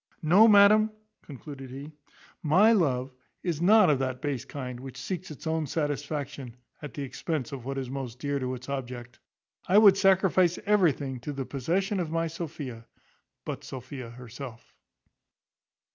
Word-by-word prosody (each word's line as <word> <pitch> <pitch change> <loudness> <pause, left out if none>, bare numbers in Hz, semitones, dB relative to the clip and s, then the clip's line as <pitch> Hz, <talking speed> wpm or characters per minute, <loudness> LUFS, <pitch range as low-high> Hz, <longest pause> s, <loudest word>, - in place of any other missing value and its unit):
No, 185 +8 +7
madam," 210 +1 +6 0.3
concluded 135 -1 -10
he, 140 +4 -8 0.5
"my 185 +9 +5
love 135 - +1 0.3
is 170 -4 -2
not 210 +2 +6
of 145 -4 +3
that 130 -1 -2
base 135 -4 -3
kind 125 -3 -6
which 130 -1 -9
seeks 180 +8 -5
its 150 +1 -10
own 160 -1 -1
satisfaction 145 -4 -3 0.2
at 150 -6 -8
the 140 - -4
expense 150 +2 -4
of 130 -4 -7
what 135 +1 -4
is 135 -1 -3
most 130 -2 -6
dear 140 +1 -2
to 130 -1 -2
its 125 0 -11
object. 125 -3 -6 0.5
I 190 - +5
would 205 -3 +8
sacrifice 190 -2 +3
everything 150 -10 +2
to 140 +5 -5
the 135 -1 -4
possession 185 - -1
of 170 -3 -2
my 165 +1 0
Sophia, 150 -8 -6 0.6
but - - -5
Sophia 125 -1 -8
herself." 125 0 -10
145 Hz, 155 wpm, -28 LUFS, 130-170 Hz, 0.6 s, would